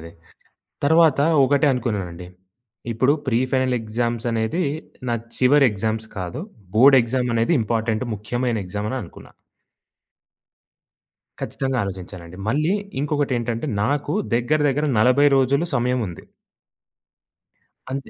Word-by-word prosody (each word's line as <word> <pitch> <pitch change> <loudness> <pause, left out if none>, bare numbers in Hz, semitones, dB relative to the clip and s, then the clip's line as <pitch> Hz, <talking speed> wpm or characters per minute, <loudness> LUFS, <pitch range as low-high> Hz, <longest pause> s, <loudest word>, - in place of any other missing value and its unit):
అది. 85 +1 -10 0.7
తరువాత 160 -1 +4 0.3
ఒకటే 145 +2 +3
అనుకున్నానండి, 95 -8 -4 0.6
ఇప్పుడు 130 +5 +2
ప్రీ 120 -1 +2
ఫైనల్ 130 -1 +1
ఎగ్జామ్సనేది 115 +5 -1 0.4
నా 120 - +1 0.2
చివరి 140 +2 +5
ఎగ్జామ్స్ 110 +2 -3
కాదు. 95 - -4 0.3
బోర్డ్ 135 +4 +7
ఎగ్జామనేది 120 +3 0
ఇంపార్టెంటు, 110 +1 -1
ముఖ్యమైన 120 +3 -2
ఎగ్జామ్ 105 +3 -4
అననుకున్నా. 125 -10 -7 2.1
ఖచ్చితంగా 135 -1 -2
ఆలోచించానండి. 90 -2 -8
మళ్ళీ 155 - +1 0.3
ఇంకొకటేంటంటే 130 -4 -1 0.2
నాకు 145 - -1 0.2
దగ్గర 140 +6 +1
దగ్గర 150 +3 0
40 130 +5 +5
రోజులు 140 +5 +2
సమయం 125 +1 +1
ఉంది. 85 - -10 1.7
అంతే 135 0 -5
120 Hz, 100 wpm, -22 LUFS, 110-140 Hz, 2.1 s, బోర్డ్